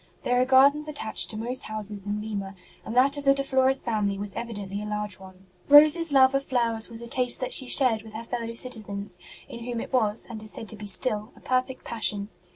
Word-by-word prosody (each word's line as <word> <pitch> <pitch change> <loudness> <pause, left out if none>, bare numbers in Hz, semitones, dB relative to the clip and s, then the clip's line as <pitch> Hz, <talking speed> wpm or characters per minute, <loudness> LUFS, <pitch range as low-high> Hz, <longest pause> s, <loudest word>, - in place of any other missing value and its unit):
There 245 0 +1
are - - +2
gardens 280 +3 +4
attached 290 -7 -1
to 215 - -1
most 245 +4 0
houses 210 -2 -4
in 205 +1 -2
Lima, 200 -2 -6 0.3
and 225 - -7
that 275 +3 +4
of - - -8
the 275 0 +4
De 275 - -1
Flores 265 0 +1
family 210 -4 -1
was 200 0 -2
evi 235 -1 -6
dently 200 0 -5
a 210 - -6
large 210 -2 -4
one. 190 0 -15 0.2
Rose 295 +2 +9
s 330 -2 +1
love 265 -1 +5
of 275 0 0
flowers 235 -4 -1
was 230 0 -7
a 235 - -8
taste 250 -1 +1
that 255 - -3
she 260 - +1
shared 245 -5 +3
with 220 0 -14
her 220 +1 -7
fellow 230 -1 -5
citizens, 205 -6 0 0.3
in 235 - -10
whom 240 -1 -4
it - - -8
was, 220 -4 +1
and 225 -3 -8
is 215 - -5
said 220 - -8
to - - -4
be 210 0 -8
still, 210 +2 +1
a - - -17
perfect 255 +1 -2
passion. 210 -3 -3
230 Hz, 240 wpm, -25 LUFS, 210-260 Hz, 0.3 s, Rose